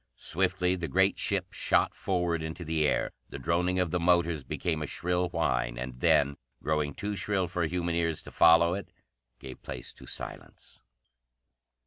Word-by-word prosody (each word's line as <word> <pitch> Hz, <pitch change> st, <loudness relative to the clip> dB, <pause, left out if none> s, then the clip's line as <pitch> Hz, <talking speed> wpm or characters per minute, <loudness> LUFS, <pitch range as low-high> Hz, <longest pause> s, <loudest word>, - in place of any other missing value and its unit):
Swiftly 90 Hz, +2 st, 0 dB
the 85 Hz, -2 st, -3 dB
great 95 Hz, +1 st, +2 dB
ship 95 Hz, -3 st, 0 dB
shot -, -, +2 dB
forward 90 Hz, -3 st, -1 dB
into 80 Hz, +2 st, -5 dB
the 80 Hz, -1 st, +1 dB
air. -, -, 0 dB, 0.2 s
The -, -, -6 dB
droning 90 Hz, +2 st, 0 dB
of 90 Hz, -3 st, +1 dB
the 90 Hz, -, +1 dB
motors 85 Hz, -3 st, +2 dB
became 80 Hz, +2 st, -2 dB
a 75 Hz, -, -3 dB
shrill 90 Hz, +2 st, -1 dB
whine, -, -, 0 dB
and 60 Hz, 0 st, -6 dB
then, 70 Hz, +2 st, +3 dB, 0.3 s
growing 75 Hz, -2 st, 0 dB
too 105 Hz, 0 st, -3 dB
shrill 95 Hz, -2 st, 0 dB
for 85 Hz, -1 st, -1 dB
human 85 Hz, 0 st, -1 dB
ears 85 Hz, -2 st, -1 dB
to -, -, -11 dB
follow 85 Hz, +1 st, +6 dB
it, 100 Hz, +2 st, -5 dB, 0.5 s
gave 65 Hz, -1 st, -10 dB
place -, -, -7 dB
to -, -, -14 dB
silence. -, -, -8 dB
85 Hz, 165 wpm, -29 LUFS, 80-90 Hz, 0.5 s, follow